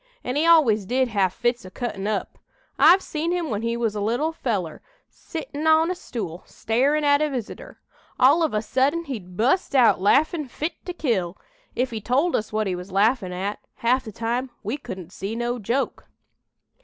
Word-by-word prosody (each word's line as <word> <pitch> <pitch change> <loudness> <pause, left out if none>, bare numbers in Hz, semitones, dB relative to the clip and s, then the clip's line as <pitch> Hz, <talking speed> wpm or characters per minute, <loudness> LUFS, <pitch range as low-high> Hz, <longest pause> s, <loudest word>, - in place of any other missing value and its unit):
An' 250 - -3
he 310 +3 +2
always 235 - +5
did 255 +2 +1
have 195 -4 +1
fits 240 +4 -1
o' 185 - -9
cuttin' 200 -1 -4
up. 215 -1 -3 0.4
I've 375 +2 +7
seen 320 +2 -2
him 350 -5 -1
when 210 0 -1
he 230 +1 -1
was 230 -3 0
a 210 - -3
little 240 +10 0
feller, 205 - -3 0.3
settin' 315 -2 -5
on 320 +2 +4
a - - +1
stool, 200 - -6
starin' 275 +7 +1
at 285 0 +4
a 305 - +1
visitor. 250 -6 -7 0.4
All 275 +6 +6
of 320 - +2
a 210 - 0
sudden 280 +8 +1
he'd 190 - -7
bu'st 275 - +1
out 245 -7 +5
laughin' 300 - +2
fit 310 +6 -4
to 360 - -3
kill. 200 - -1 0.4
If 250 0 0
he 220 -2 -4
told 275 - +1
us 215 - -2
what 215 0 0
he 190 - -1
was 180 +2 -8
laughin' 200 0 +2
at, 195 +4 -3 0.2
half 250 +3 +1
the 220 - -7
time 235 +4 -2
we 215 +6 -2
couldn't 185 - -8
see 200 +4 -5
no 240 +1 -2
joke. 235 +6 -2
240 Hz, 190 wpm, -24 LUFS, 210-290 Hz, 0.4 s, I've